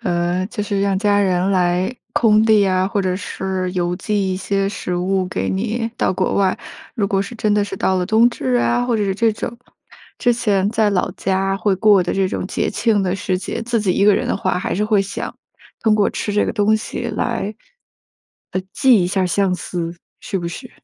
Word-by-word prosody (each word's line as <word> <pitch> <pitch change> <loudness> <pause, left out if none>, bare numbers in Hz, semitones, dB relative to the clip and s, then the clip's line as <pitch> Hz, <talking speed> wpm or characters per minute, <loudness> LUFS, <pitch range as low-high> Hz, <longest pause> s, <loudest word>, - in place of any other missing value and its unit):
呃， 175 +1 0
就 215 -1 -4
是 200 -1 -1
让 195 -1 +1
家 205 0 +2
人 185 -1 +1
来 180 +3 +1 0.2
空 215 -2 +4
递 215 -2 +4
啊， 185 0 +1
或 205 -1 0
者 185 -1 0
是 190 -1 -3
邮 175 -1 -1
寄 200 -1 -1
一 185 - -2
些 195 +1 -1
食 180 -3 -4
物 185 +1 0
给 - - -2
你 225 +4 -1
到 - - +2
国 185 0 -1
外。 195 +1 +1 0.4
如 210 -5 0
果 195 0 +1
是 200 +5 -5
真 215 -2 0
的 205 0 +3
是 200 -1 -5
到 190 0 +1
了 180 -1 -1
冬 220 +3 +5
至 130 - -2
啊， 120 - +2
或 245 -2 0
者 210 - 0
是 195 -1 -1
这 225 +3 +2
种 230 +2 -5 0.6
之 245 - +3
前 205 -5 +1
在 220 -1 +2
老 185 -3 0
家 195 +1 -1
会 195 0 +1
过 205 -1 +5
的 175 - -2
这 195 -1 +2
种 185 - -3
节 - - -1
庆 210 -1 +1
的 185 -1 0
时 185 -1 -1
节， - - -4
自 235 0 0
己 195 -3 +1
一 200 - +2
个 205 -1 +6
人 - - -1
的 - - 0
话， 185 -1 -1
还 180 - -2
是 210 - 0
会 210 -2 +3
想 195 +1 -5 0.5
通 220 -2 +4
过 210 -1 +3
吃 205 - -3
这 210 - +2
个 - - -1
东 215 0 +2
西 215 - -5
来， - - -2 1.0
呃， 185 - 0
寄 255 -8 +4
一 - - 0
下 185 0 0
相 190 +1 +1
思， 170 -2 -4 0.3
是 195 - -3
不 170 -1 -4
是？ 250 +8 -8
195 Hz, 240 characters per minute, -19 LUFS, 185-210 Hz, 1.0 s, 个